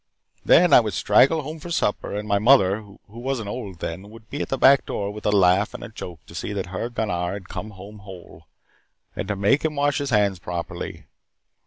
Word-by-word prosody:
Then 175 +1 +5
I - - +10
would 105 -6 -2
straggle 135 - +4
home 155 +3 -7
for 175 - -9
supper 105 -11 -1
and 105 +1 -4
my 100 -1 +2
mother, 105 -4 +4
who 100 -1 -16
wasn't 120 0 -4
old 100 -7 -7
then, 95 +5 -5
would 110 0 -16
be 145 - -3
at - - -4
the 135 - -1
back 135 +1 +6
door 100 0 -3
with 105 0 -5
a - - +3
laugh 95 0 +3
and - - -8
a - - -7
joke 90 -7 -9
to - - -14
see 85 +5 -4
that 100 -2 -3
her 115 +5 -3
Gunnar 95 -7 -2
had 95 -2 -8
come 110 - -6
home 105 +1 -12
whole, 95 -3 -13 0.7
and 90 - -4
to 105 - -1
make 100 +9 +2
him 155 -1 -1
wash 145 +1 +1
his 140 -1 -3
hands 100 -5 +2
properly. 85 0 -6
105 Hz, 220 wpm, -23 LUFS, 95-130 Hz, 0.7 s, I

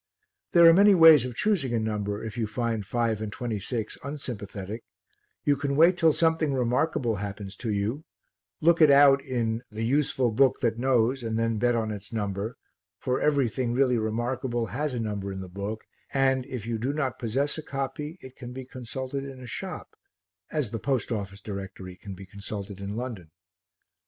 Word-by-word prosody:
There 170 -1 +8
are 165 - +10
many 200 +2 +7
ways 160 -6 +8
of 125 -2 -5
choosing 155 - +1
a - - +2
number 105 -2 -2
if 110 -2 -6
you 115 -2 -1
find 115 -1 -2
five 115 +1 -1
and 110 -1 -4
twenty 115 -3 -3
six 110 +2 -3
unsympathetic; 110 -7 -6 0.6
you 145 - +4
can 140 0 -2
wait 170 +5 +6
till 165 -2 +4
something 160 -2 +2
remarkable 125 -2 +1
happens 100 0 -6
to 120 - -4
you, 105 +9 -1 0.6
look 170 +1 +4
it 155 - +8
out 140 -1 +7
in 115 -4 -1
"the 110 +1 -4
useful 130 -2 +2
book 130 +4 +3
that 115 -2 0
knows" 130 0 +2
and 110 -1 -2
then 115 -1 0
bet 120 +1 +2
on 110 -2 -1
its 100 +1 -8
number, 105 0 -3 0.4
for 125 0 -1
everything 130 -4 +1
really 125 -2 +3
remarkable 120 +2 -1
has 130 +6 -3
a - - -2
number 100 -3 -3
in 95 - -5
the 95 - -6
book 100 +4 -5 0.3
and, 135 -1 +2
if 125 -6 -5
you 115 -1 -2
do 130 +5 -1
not 140 -4 -2
possess 135 +7 -1
a - - -3
copy, 145 +3 -4
it 130 0 -12
can 125 0 -8
be 130 0 -7
consulted 130 +2 -5
in 135 -2 -8
a 130 - -9
shop 120 - -7 0.5
as 145 -9 -2
the 115 - -3
Post 130 -2 -1
Office 100 -3 -4
Directory 95 -2 -7
can 95 +1 -9
be 95 +1 -10
consulted 100 0 -6
in 100 +1 -4
London. 115 -9 -5
120 Hz, 185 wpm, -27 LUFS, 105-135 Hz, 0.6 s, are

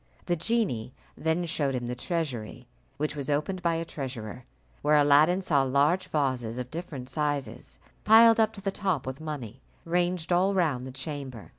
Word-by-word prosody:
The 175 - +1
genie 170 - -1 0.2
then 160 +2 0
showed 145 -5 -1
him 120 -1 -3
the 120 - -3
treasury, 125 - -4 0.3
which 150 0 -2
was 140 -2 -5
opened 155 +6 -1
by 170 -1 +1
a 165 0 -2
treasurer, 125 -6 -6 0.4
where 150 +1 +3
Aladdin 150 +6 +5
saw 145 -6 +3
large 140 +7 +2
vases 130 -6 -1
of 125 0 -5
different 150 -6 -6
sizes, 140 -4 -3 0.3
piled 225 +1 +7
up 220 -1 +4
to 200 - -9
the 195 0 -1
top 185 -9 -1
with 130 +3 -6
money, 135 -6 -6 0.2
ranged 175 0 0
all 190 +3 +3
round 145 -9 0
the - - -7
chamber. 135 -4 -6
150 Hz, 170 wpm, -28 LUFS, 130-175 Hz, 0.4 s, piled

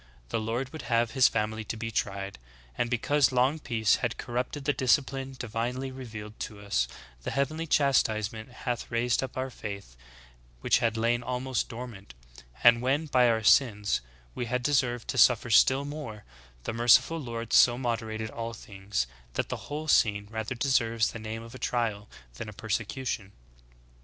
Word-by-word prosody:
The - - -1
Lord 115 +4 -2
would 155 - -7
have 115 -1 +2
his 130 -2 +5
family 110 0 -1
to 110 - -4
be 115 +1 -4
tried. 100 - -3 0.4
And 120 - 0
because 130 +3 +2
long 130 +5 +2
peace 110 -7 +2
had 120 -2 -2
corrupt 125 +4 -3
ed 140 - -9
the 145 - +2
discipline 135 +1 +1
divinely 125 +2 -3
revealed 110 -5 -8
to 105 - -6
us, 100 -13 0 0.3
the - - -4
heavenly 155 +4 -1
chas 140 -3 +4
tisement 110 +1 -4
hath 125 -1 -4
raised 120 0 +1
up 130 -1 -5
our 130 0 -2
faith, 100 - -7 0.7
which - - +3
had 115 -1 0
lain 120 +1 +1
almost 125 0 -2
dormant: 115 - -9 0.5
and 120 0 +7
when, 135 +5 +1
by 125 -5 +4
our 110 -1 +1
sins, 105 - +4 0.3
we 120 - -3
had 125 +1 -1
deserved 125 -4 +1
to - - 0
suffer 120 -1 +5
still 130 +5 +5
more, 140 -8 -7 0.4
the - - -3
merciful 120 +8 +5
Lord 115 -3 -5
so 120 -1 +6
moderated 110 -3 -3
all 115 0 -5
things, 100 - -3 0.3
that - - -2
the - - -6
whole 150 +2 -4
scene 105 -7 +3
rather 110 +2 -3
deserves 115 -4 +2
the 115 - -7
name 110 +1 -5
of 115 +1 -11
a 130 - -9
trial 110 -4 -1 0.3
than 105 - -5
a - - -9
persecution. 110 0 -3
120 Hz, 170 wpm, -28 LUFS, 110-130 Hz, 0.7 s, and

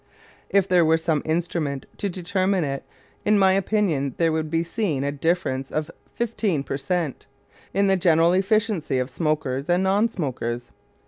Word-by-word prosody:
If 200 -1 +3
there 180 -2 +4
were 160 0 +4
some 160 -2 0
instrument 160 -4 -1
to 200 - -2
determine 185 +1 0
it, 135 -2 -3 0.4
in 210 0 +3
my 190 -1 +5
opinion 190 - 0
there 165 -1 +2
would 155 -1 -1
be 165 +1 +1
seen 170 -6 -1
a 140 - 0
difference 145 -3 -1
of 155 +1 -3 0.2
fifteen 215 - -1
per - - -4
cent. 150 +1 -2 0.4
in 200 +1 +2
the 195 -1 +3
general 170 -1 +4
efficiency 195 - +1
of 130 +1 -2
smokers 145 -2 -1
and 175 +2 +3
non 200 +4 +3
smokers. 120 - -4
170 Hz, 165 wpm, -24 LUFS, 145-190 Hz, 0.4 s, my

